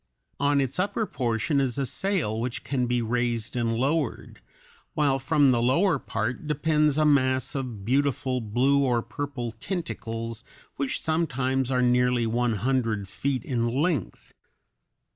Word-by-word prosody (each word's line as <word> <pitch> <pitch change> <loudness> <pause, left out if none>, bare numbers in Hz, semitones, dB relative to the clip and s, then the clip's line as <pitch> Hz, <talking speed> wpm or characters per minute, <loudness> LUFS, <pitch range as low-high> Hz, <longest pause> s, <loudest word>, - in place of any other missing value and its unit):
On 145 0 +3
its 135 +4 -1
upper 200 +4 0
portion 125 - 0
is 130 -2 -1
a 140 - 0
sail 165 - -1
which 120 +1 -3
can 125 -3 -1
be 120 0 0
raised 120 -1 -1
and 115 -2 0
lowered, 140 +2 -1 0.5
while 140 -3 +2
from 135 +1 +3
the 120 -2 +2
lower 145 +6 +3
part 120 +8 -3
depends 150 -1 +2
a 155 - +3
mass 130 -3 +2
of 125 -8 -5
beautiful 130 0 +1
blue 130 +6 +2
or 120 -3 +1
purple 140 -5 -4
tentacles 115 - -5 0.3
which 140 -1 -2
sometimes 135 -5 0
are 125 -1 +2
nearly 125 -1 +3
one 120 +1 +1
hundred 115 -2 0
feet 135 +5 -2
in 120 -6 0
length. 140 - -2
130 Hz, 145 wpm, -26 LUFS, 120-145 Hz, 0.5 s, On